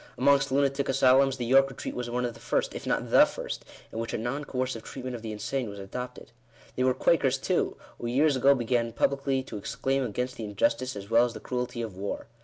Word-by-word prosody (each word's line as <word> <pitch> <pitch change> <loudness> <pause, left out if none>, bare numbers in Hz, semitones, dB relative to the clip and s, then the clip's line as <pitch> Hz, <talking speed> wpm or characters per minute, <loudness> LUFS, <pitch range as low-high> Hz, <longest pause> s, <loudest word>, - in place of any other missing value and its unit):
Amongst 140 0 +3
lunatic 140 0 +1
asylums, 135 0 +4
the 120 - -3
York 135 +3 +5
Retreat 135 - -6
was 125 -1 -4
one 125 +1 -1
of 120 - -3
the 115 - -14
first, - - -1
if - - -7
not - - -1
the - - +8
first, - - -6 0.3
in 115 - -5
which 115 - -3
a - - 0
non 120 +6 -3
coercive 130 -3 -2
treatment 125 +2 -6
of 115 - -7
the 110 -1 -5
insane 120 +3 -3
was 100 - -8
adopted. 125 +6 -7 0.4
They 130 - 0
were 130 0 +3
Quakers 135 -5 +3
too, 180 +6 0 0.2
who 120 - -4
years 140 +4 +3
ago 135 +2 +5
began 120 -2 0
publicly 135 +1 +1
to 115 -5 -7
exclaim 135 +6 -1
against 125 +2 -3
the 115 - -5
injustice 115 +5 0
as 100 +1 -8
well 115 +1 +6
as 120 - -5
the - - -6
cruelty 125 -1 -3
of 110 -5 -6
war. 100 +2 -4
125 Hz, 225 wpm, -28 LUFS, 115-135 Hz, 0.4 s, the